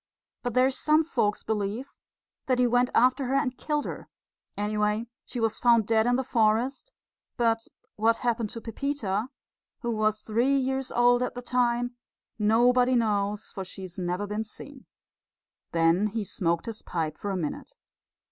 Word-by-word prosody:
But 245 -3 -3
there's 260 +1 +4
some 305 +3 +3
folks 235 -10 0
believe 215 +4 -3 0.5
that 255 -1 +2
he 250 - +4
went 245 +1 +3
after 255 +3 +4
her 260 +2 0
and 275 -2 +1
killed 295 +1 -2
her - - -7 0.5
anyway, 210 +1 0 0.2
she 245 - -5
was 225 -1 0
found 235 -3 +4
dead 220 +1 +2
in 245 - +3
the 265 - 0
forest 245 - +1 0.5
but 230 -2 +1 0.3
what 225 +2 +3
happened 235 -3 -1
to 230 - -8
Pepita, 225 -3 -2 0.5
who 235 - -1
was 215 -1 0
three 240 +6 +2
years 265 0 -1
old 245 0 +4
at 250 - -2
the 245 - -5
time, 245 0 0 0.4
nobody 245 +4 +4
knows, 210 -2 0
for 195 - -5
she's 190 -1 -8
never 180 +3 -2
been 210 +2 -2
seen." 265 +5 -11 0.8
Then 165 +5 +3
he 215 +1 -3
smoked 170 -2 -1
his 225 -2 -6
pipe 160 -3 -3
for 205 - -5
a 195 - -1
minute. 155 -5 -5
230 Hz, 160 wpm, -27 LUFS, 210-250 Hz, 0.8 s, there's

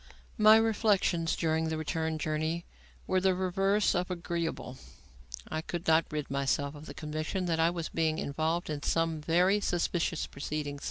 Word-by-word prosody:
My 215 +1 +8
reflections 205 -7 +2
during 160 -1 0
the 160 - -2
return 160 0 -2
journey 155 +2 -2 0.4
were 185 0 +1
the 190 -1 +3
reverse 195 +3 +2
of 180 +1 -1
agreeable. 170 -7 -3 0.7
I 155 - -3
could 170 +1 -5
not 160 0 +5
rid 150 -2 -4
myself 140 +1 0
of 150 +1 -11
the - - -8
conviction 155 +5 -3
that 165 -2 0
I 165 +1 +4
was 170 -2 -4
being 160 -1 0
involved 160 +4 -1
in 145 -1 -3
some 165 0 0
very 180 +6 +3
suspicious 175 -3 0
proceedings. 145 0 -4
165 Hz, 160 wpm, -30 LUFS, 155-180 Hz, 0.7 s, My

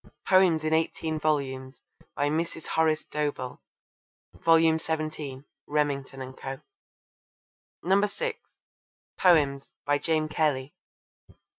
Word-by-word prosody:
Poems 185 -4 +5
in 155 0 0
eighteen 160 0 0
volumes. 135 -3 -1 0.4
By 145 - +1
Mrs. 160 +1 -2
Horace 160 -1 +2
Dobell. 145 -4 -3 0.7
Vol. 165 0 +4 0.2
xvii. 155 -4 -4 0.2
(Remington 140 -3 -1
and 130 0 -9
Co.) 135 0 -6 1.5
(6) 480 - -4 0.8
Poems. 145 -6 +3
By 145 0 +2
James 155 -1 0
Kelly. 145 -3 0
155 Hz, 95 wpm, -27 LUFS, 140-160 Hz, 1.5 s, Poems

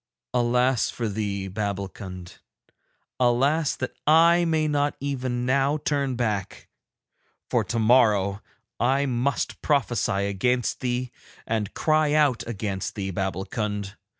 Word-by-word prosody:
Alas 125 0 +2
for 115 - -3
thee, 100 -2 -3
Babbulkund, 95 -2 -5 0.8
alas 135 +5 +2
that 130 - -4
I 170 +3 +6
may 160 -2 +1
not 145 -1 0
even 130 -3 -2
now 140 +3 +2
turn 140 -3 -1
back, 105 -5 -3 0.8
for - - +2
tomorrow 110 -4 +3 0.4
I 135 +3 +2
must 130 +1 -1
prophesy 120 -8 +1
against 125 +5 0
thee 125 -1 -2 0.3
and 110 -3 -2
cry 155 -1 +2
out 145 -5 +3
against 100 -4 -4
thee, 95 -2 -3
Babbulkund. 95 +2 -3
120 Hz, 110 wpm, -25 LUFS, 100-140 Hz, 0.8 s, I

